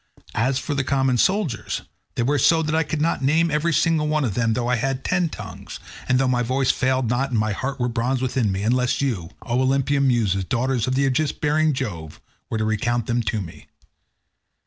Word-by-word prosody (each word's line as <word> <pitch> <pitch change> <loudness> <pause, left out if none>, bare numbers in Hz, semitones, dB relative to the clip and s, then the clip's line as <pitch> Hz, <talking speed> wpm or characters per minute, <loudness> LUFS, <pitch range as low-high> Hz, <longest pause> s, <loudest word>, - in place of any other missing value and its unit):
As 130 +4 +1
for 145 - -3
the 140 -1 0
common 130 -2 +1
soldiers, 185 - 0 0.3
they 120 - 0
were 145 +4 +1
so 165 -1 +4
that 155 0 -2
I 160 - +3
could 155 -1 -2
not 165 -3 0
name 160 +4 +2
every 150 +3 +1
single 160 -1 +2
one 155 -2 +1
of 110 - -1
them 115 0 +1
though 120 +1 -1
I 125 0 +2
had 135 +2 -2
ten 180 -2 +1
tongues, - - -9 0.3
and 130 - +4
though 135 0 +2
my 125 -1 +1
voice 130 +2 +1
failed 130 -1 0
not 125 +4 0
and 120 - -1
my 110 0 +1
heart 135 +6 -3
were 120 - +1
of 120 - -3
bronze 125 +2 0
within 125 -4 0
me, 95 +1 -2
unless 125 +3 +1
you, 110 -12 -2
O 125 +1 0
Olympian 135 +1 +2
Muses, 105 -6 +1
daughters 125 +3 -1
of 130 0 0
aegis 140 +2 +1
bearing 155 0 +1
Jove, 85 - -5 0.3
were 110 - -2
to 110 - 0
recount 110 +2 0
them 120 0 0
to 105 -1 -2
me. 85 -4 -10
130 Hz, 215 wpm, -22 LUFS, 115-140 Hz, 0.3 s, so